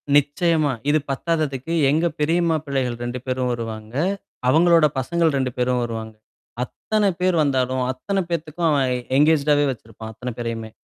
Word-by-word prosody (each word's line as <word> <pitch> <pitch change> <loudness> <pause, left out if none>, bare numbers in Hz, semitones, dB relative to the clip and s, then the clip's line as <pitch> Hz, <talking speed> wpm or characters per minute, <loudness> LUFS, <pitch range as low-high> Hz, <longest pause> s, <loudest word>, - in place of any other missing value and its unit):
நிச்சயமா. 150 +1 +2 0.2
இது 155 +1 +4
பத்தாததுக்கு 155 0 -2 0.2
எங்க 155 +4 +2
பெரியம்மா 165 +2 +2
பிள்ளைகள் 130 -4 -2
2 120 +1 -4
பேரும் 130 -1 -1
வருவாங்க. 110 -1 -6 0.5
அவங்களோட 165 +2 +5
பசங்கள் 165 +2 +1
2 130 -1 0
பேரும் 125 0 +1
வருவாங்க. 110 -1 -5 0.5
அத்தனை 210 - 0
பேர் 185 -1 +2
வந்தாலும், 130 -2 0
அத்தனை 195 +10 -2
பேத்துக்கும் 165 0 -1
அவன் 135 -3 +2 0.3
என்கேஜ்டாவே 150 -1 +4
வச்சிருப்பான், 110 -2 -9
அத்தன 125 +3 -5
பேரையுமே. 115 -2 -4
140 Hz, 135 wpm, -22 LUFS, 125-160 Hz, 0.5 s, அவங்களோட